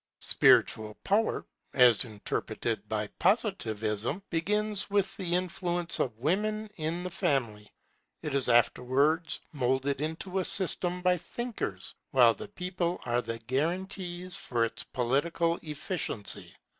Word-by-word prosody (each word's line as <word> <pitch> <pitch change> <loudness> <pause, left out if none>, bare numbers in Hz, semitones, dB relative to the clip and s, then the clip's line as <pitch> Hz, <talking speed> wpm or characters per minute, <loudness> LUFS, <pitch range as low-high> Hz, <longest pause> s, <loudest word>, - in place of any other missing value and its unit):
Spiritual 110 -1 +4
power, 215 +3 +1 0.3
as 125 -2 +6
interpreted 105 -3 -3
by - - -1
Positivism, 110 - 0
begins 210 +5 0
with 200 -1 +1
the 175 -3 -1
influence 175 -1 -1
of 115 -4 -1
women 210 - 0
in 165 +2 -2
the 180 - -3
family; 120 - -1 0.5
it 150 -3 -3
is 140 -3 +4
afterwards 140 +7 +2
moulded 135 0 0
into 165 +5 -2
a - - 0
system 180 -1 -1
by 180 0 +4
thinkers, 175 - -4 0.2
while 120 -3 +6
the 215 - -8
people 180 -2 -3
are 120 0 +1
the 115 -1 -4
guarantees 180 - -2
for 120 -9 0
its 115 - -5
political 165 +7 0
efficiency. 150 - -3
160 Hz, 120 wpm, -29 LUFS, 125-180 Hz, 0.5 s, as